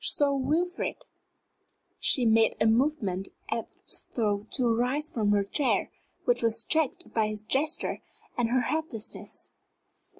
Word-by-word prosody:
"Sir 285 Hz, -1 st, +3 dB
Wilfrid!" 315 Hz, +7 st, -1 dB, 0.9 s
She 250 Hz, -, +4 dB
made 225 Hz, 0 st, +4 dB
a -, -, +3 dB
movement 220 Hz, -, +1 dB, 0.2 s
as 225 Hz, 0 st, -3 dB
though 210 Hz, -2 st, 0 dB
to 240 Hz, -3 st, +1 dB
rise 265 Hz, +6 st, 0 dB
from 215 Hz, -3 st, 0 dB
her 205 Hz, -1 st, +3 dB
chair, 260 Hz, +8 st, +1 dB, 0.3 s
which 485 Hz, -, +3 dB
was 230 Hz, 0 st, +1 dB
checked 320 Hz, -4 st, 0 dB
by 220 Hz, -2 st, +2 dB
his 215 Hz, 0 st, -4 dB
gesture 290 Hz, +8 st, 0 dB, 0.3 s
and 240 Hz, -2 st, +1 dB
her 255 Hz, +1 st, +3 dB
helplessness. 250 Hz, -5 st, -4 dB
240 Hz, 130 wpm, -28 LUFS, 220-290 Hz, 0.9 s, She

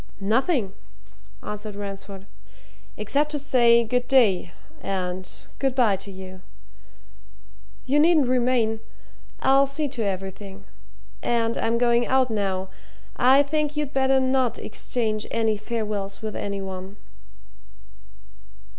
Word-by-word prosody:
"Nothing!" 220 Hz, -, +1 dB, 0.7 s
answered 210 Hz, 0 st, -6 dB
Ransford. 195 Hz, -1 st, -7 dB, 0.7 s
"Except 280 Hz, +8 st, 0 dB
to -, -, 0 dB
say 240 Hz, -4 st, +4 dB
good 245 Hz, +2 st, -1 dB
day 205 Hz, -9 st, +3 dB, 0.3 s
and 185 Hz, -1 st, -3 dB, 0.3 s
good 270 Hz, -2 st, 0 dB
bye 235 Hz, -6 st, +4 dB
to 200 Hz, -, -10 dB
you. 185 Hz, -1 st, -10 dB, 1.4 s
You 280 Hz, +3 st, +2 dB
needn't 315 Hz, -2 st, +5 dB
remain 245 Hz, -3 st, +1 dB, 0.6 s
I'll 275 Hz, +1 st, +4 dB
see 290 Hz, +2 st, -1 dB
to 255 Hz, -3 st, -5 dB
everything. 195 Hz, 0 st, -5 dB, 0.6 s
And 230 Hz, -1 st, 0 dB
I'm 230 Hz, +1 st, 0 dB
going 240 Hz, 0 st, +3 dB
out 260 Hz, -2 st, +2 dB
now. 190 Hz, -3 st, -1 dB, 0.5 s
I 265 Hz, +3 st, +6 dB
think 300 Hz, 0 st, -1 dB
you'd 295 Hz, -1 st, -2 dB
better 265 Hz, 0 st, +3 dB
not 260 Hz, -2 st, +1 dB
exchange 215 Hz, -1 st, -2 dB
any 225 Hz, -1 st, +1 dB
farewells 210 Hz, -2 st, -4 dB
with 215 Hz, -1 st, -4 dB
any 200 Hz, -1 st, -3 dB
one." 190 Hz, +1 st, -7 dB
230 Hz, 115 wpm, -24 LUFS, 200-265 Hz, 1.4 s, I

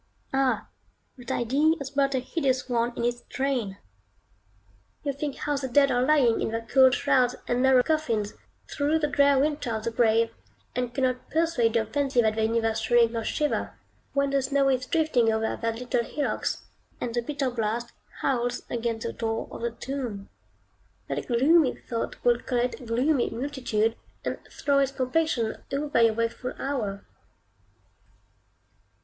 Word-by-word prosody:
Ah! 270 Hz, -1 st, +1 dB, 0.5 s
that 245 Hz, -2 st, -11 dB
idea 285 Hz, +7 st, +2 dB
has 280 Hz, -3 st, -6 dB
brought 275 Hz, -1 st, +1 dB
a -, -, +2 dB
hideous 260 Hz, -1 st, -1 dB
one 240 Hz, -1 st, +1 dB
in 235 Hz, -, -1 dB
its 240 Hz, 0 st, -1 dB
train. 255 Hz, -8 st, -1 dB, 1.3 s
You 285 Hz, -2 st, -1 dB
think 280 Hz, 0 st, -4 dB
how 295 Hz, -1 st, -2 dB
the 270 Hz, -1 st, -3 dB
dead 275 Hz, +2 st, +4 dB
are 245 Hz, -1 st, +2 dB
lying 255 Hz, -4 st, +3 dB
in -, -, 0 dB
their 225 Hz, 0 st, -3 dB
cold 260 Hz, -2 st, +6 dB
shrouds 250 Hz, -1 st, +2 dB
and 245 Hz, +1 st, +1 dB
narrow 260 Hz, -1 st, +5 dB
coffins, 235 Hz, -10 st, 0 dB, 0.3 s
through 295 Hz, +2 st, +1 dB
the 310 Hz, -, 0 dB
drear 285 Hz, -1 st, +4 dB
winter 290 Hz, -1 st, 0 dB
of 220 Hz, -, -4 dB
the 230 Hz, -, -1 dB
grave, 230 Hz, -1 st, +3 dB, 0.4 s
and 250 Hz, -1 st, -1 dB
cannot 255 Hz, 0 st, -1 dB
persuade 315 Hz, -9 st, +1 dB
your 225 Hz, -1 st, +2 dB
fancy 275 Hz, +1 st, 0 dB
that 220 Hz, -1 st, +2 dB
they 220 Hz, 0 st, +1 dB
neither 225 Hz, 0 st, +1 dB
shrink 230 Hz, +1 st, +3 dB
nor 230 Hz, -1 st, -3 dB
shiver, 300 Hz, +6 st, -1 dB, 0.4 s
when 280 Hz, 0 st, +1 dB
the 275 Hz, 0 st, +2 dB
snow 275 Hz, +1 st, +2 dB
is 255 Hz, -1 st, 0 dB
drifting 285 Hz, -9 st, +2 dB
over 220 Hz, 0 st, 0 dB
their 230 Hz, -1 st, -2 dB
little 245 Hz, +1 st, -1 dB
hillocks, 290 Hz, +5 st, -2 dB, 0.4 s
and 235 Hz, -, -3 dB
the 240 Hz, -, +1 dB
bitter 275 Hz, +1 st, -2 dB
blast 235 Hz, 0 st, -2 dB, 0.3 s
howls 245 Hz, -2 st, 0 dB
against 230 Hz, -1 st, -2 dB
the 230 Hz, -, -3 dB
door 225 Hz, -1 st, -2 dB
of -, -, -8 dB
the 235 Hz, -, 0 dB
tomb. 235 Hz, -5 st, -5 dB, 0.8 s
That -, -, -3 dB
gloomy 270 Hz, +4 st, +4 dB
thought 230 Hz, -1 st, -4 dB
will 240 Hz, -1 st, +4 dB
collect 245 Hz, 0 st, -1 dB
a -, -, -10 dB
gloomy 250 Hz, +4 st, +2 dB
multitude, 230 Hz, -3 st, -1 dB, 0.3 s
and -, -, -2 dB
throw 280 Hz, -1 st, +1 dB
its 275 Hz, -1 st, +1 dB
complexion 260 Hz, -3 st, 0 dB
over 285 Hz, -3 st, +1 dB
your 225 Hz, -1 st, +4 dB
wakeful 230 Hz, +2 st, -2 dB
hour. 220 Hz, -8 st, -3 dB
250 Hz, 165 wpm, -26 LUFS, 230-280 Hz, 1.3 s, cold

